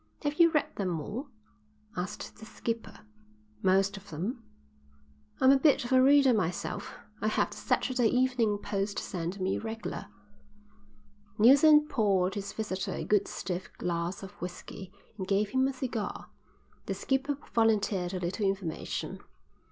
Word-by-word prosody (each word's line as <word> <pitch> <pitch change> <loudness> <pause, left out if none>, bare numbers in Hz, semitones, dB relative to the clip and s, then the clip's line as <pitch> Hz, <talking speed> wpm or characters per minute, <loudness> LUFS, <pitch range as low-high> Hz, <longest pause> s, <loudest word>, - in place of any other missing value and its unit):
"Have 290 +2 -2
you 335 0 +8
read 305 -2 -1
them 180 -5 -1
all?" 230 - -5 0.7
asked 185 +4 -5
the 220 - -10
skipper. 230 -2 -5 0.6
"Most 195 0 +3
of 200 +1 -13
them." 195 - -4 1.0
"I'm 260 - +6
a 275 - +5
bit 285 -4 +4
of 240 - -6
a 260 0 +6
reader 275 -1 +6
myself. 180 -5 -2 0.3
I 215 - +1
have 215 - +1
the - - -9
Saturday 250 -3 +1
Evening 250 -4 +2
Post 200 0 -3
sent 180 +1 -4
me 190 +1 0
regler." 220 -2 -5 1.3
Neilson 295 +6 +7
poured 195 -8 +2
his 200 -1 -4
visitor 195 -3 -3
a - - -4
good 205 -1 +2
stiff 180 -1 -4
glass 170 +2 -2
of 195 - -8
whisky 180 +1 -7 0.3
and 190 - -3
gave 200 +1 +2
him 260 0 +3
a 270 - -2
cigar. 250 -5 -4 0.6
The - - -1
skipper 270 +1 0 0.2
volunteered 205 -5 +2
a - - -2
little 185 +4 -1
information. 195 -4 -3
210 Hz, 145 wpm, -30 LUFS, 190-255 Hz, 1.3 s, you